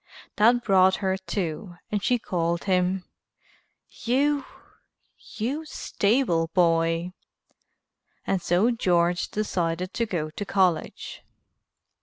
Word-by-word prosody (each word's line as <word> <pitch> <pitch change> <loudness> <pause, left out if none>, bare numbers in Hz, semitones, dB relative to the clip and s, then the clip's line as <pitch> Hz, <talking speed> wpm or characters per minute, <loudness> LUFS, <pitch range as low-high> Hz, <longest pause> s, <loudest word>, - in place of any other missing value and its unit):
That 235 +3 +4
brought 190 -2 +4
her 190 -1 -1
to 185 -2 -4 0.2
and 205 -1 0
she 245 +4 +2
called 170 -6 -2
him 185 -1 0 0.8
"You 280 +3 0 0.9
you 265 +9 -2
stable 200 - 0
boy." 165 0 +2 1.1
And 190 -2 0
so 185 +9 +2
George 175 -5 +1
decided 180 -3 -2
to 230 - -1
go 155 -6 -3
to 205 - -5
college. 185 -5 -1
185 Hz, 100 wpm, -25 LUFS, 170-215 Hz, 1.1 s, That